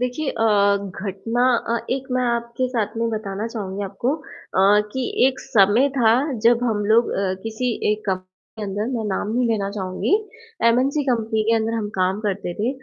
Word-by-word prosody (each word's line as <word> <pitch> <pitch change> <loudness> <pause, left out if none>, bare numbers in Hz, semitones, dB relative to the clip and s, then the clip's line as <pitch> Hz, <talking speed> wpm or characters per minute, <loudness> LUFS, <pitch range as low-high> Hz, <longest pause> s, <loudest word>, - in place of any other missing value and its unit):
देखिए 250 +4 -1
अ, 225 - -1 0.6
घटना 210 +5 -1 0.2
अ, 235 - +1
एक 265 +1 -2
मैं 255 0 +1
आपके 235 +1 -1
साथ 225 -4 -2
में 230 0 0
बताना 215 -1 -3
चाहूँगी 205 -4 -5
आपको 220 +9 -1
अ, 205 -8 +1
कि 260 -1 -2 0.2
एक 265 -1 -1
समय 230 +1 +4
था 230 -3 +5 0.3
जब 240 +1 +4
हम 210 -3 0
लोग 225 +3 +4
अ, 190 -1 0
किसी 225 +2 -2 0.2
एक 215 - -4
कंपनी 185 -1 -2 0.3
के - - -4
अंदर 205 +1 -2
मैं 225 - -3
नाम 195 +1 -2
नहीं 250 -1 +2
लेना 205 -3 0
चाहूँगी, 190 - -1 0.5
एमएनसी 265 +5 +2
कंपनी 225 -4 0
के - - +4
अंदर 225 0 -1
हम 220 -2 -2
काम 185 +2 +1
करते 200 -4 -2
थे। 215 +5 -1
225 Hz, 180 wpm, -22 LUFS, 200-245 Hz, 0.6 s, था